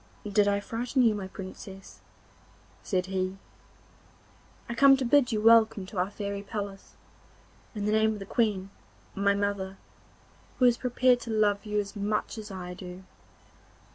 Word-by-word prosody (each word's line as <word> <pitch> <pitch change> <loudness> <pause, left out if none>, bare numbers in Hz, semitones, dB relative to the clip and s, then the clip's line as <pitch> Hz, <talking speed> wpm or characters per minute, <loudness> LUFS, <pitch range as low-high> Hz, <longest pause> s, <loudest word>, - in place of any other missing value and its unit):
'Did 205 0 +3
I 200 0 +2
frighten 240 +5 -1
you, 225 -2 +4
my 200 -2 -5
Princess?' 190 0 -10 0.8
said 185 -2 -1
he. 190 0 -2 1.3
'I 235 - -4
come 270 +3 +6
to 265 - -2
bid 255 0 +4
you 215 - 0
welcome 220 -3 +5
to 185 0 -5
our 185 +2 +1
fairy 200 -1 -4
palace, 200 -1 -7 0.8
in 205 -1 -3
the 210 - +1
name 220 0 +3
of - - -6
the 195 - -7
Queen, 200 -3 0 0.4
my 200 0 +2
mother, 200 -1 -2 0.8
who 255 - +4
is 240 -1 +5
prepared 250 0 +2
to 235 - -9
love 210 -2 +1
you 210 0 0
as 200 0 -4
much 210 +2 -2
as 215 - -8
I 180 -2 -6
do. 180 0 -9
205 Hz, 160 wpm, -28 LUFS, 195-225 Hz, 1.3 s, come